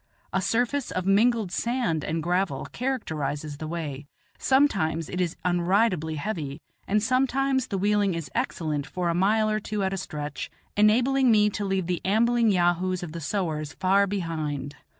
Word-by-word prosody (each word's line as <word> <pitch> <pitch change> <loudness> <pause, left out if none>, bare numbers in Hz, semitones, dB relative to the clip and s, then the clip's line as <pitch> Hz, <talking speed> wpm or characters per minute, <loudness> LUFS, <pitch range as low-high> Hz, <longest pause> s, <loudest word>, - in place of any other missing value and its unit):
A 190 - +1
surface 245 +7 0
of 185 0 -3
mingled 215 0 +3
sand 230 - 0
and 160 0 -2
gravel 175 -4 0
characterizes 155 - -3
the 155 - -5
way; 150 -4 -5 0.3
sometimes 195 - +2
it 180 - -2
is 175 -2 -1
unridably 175 -2 +2
heavy, 150 -3 -4 0.3
and 210 +1 +2
sometimes 265 +1 +1
the 195 - -2
wheeling 205 -1 +2
is 165 -3 -5
excellent 155 - -2
for 175 +3 -2
a - - +1
mile 210 +5 +2
or 215 0 +1
two 210 -1 -3
at 190 0 0
a - - -2
stretch, 150 -5 -5 0.3
enabling 245 +5 +4
me 210 -2 +4
to 205 0 -3
leave 190 -2 0
the 175 -1 -2
ambling 230 +3 +3
yahoos 180 -1 +1
of 170 - -6
the 165 +1 -6
sowars 155 -3 -2
far 195 +2 +3
behind. 155 -7 -3
185 Hz, 165 wpm, -26 LUFS, 160-215 Hz, 0.3 s, enabling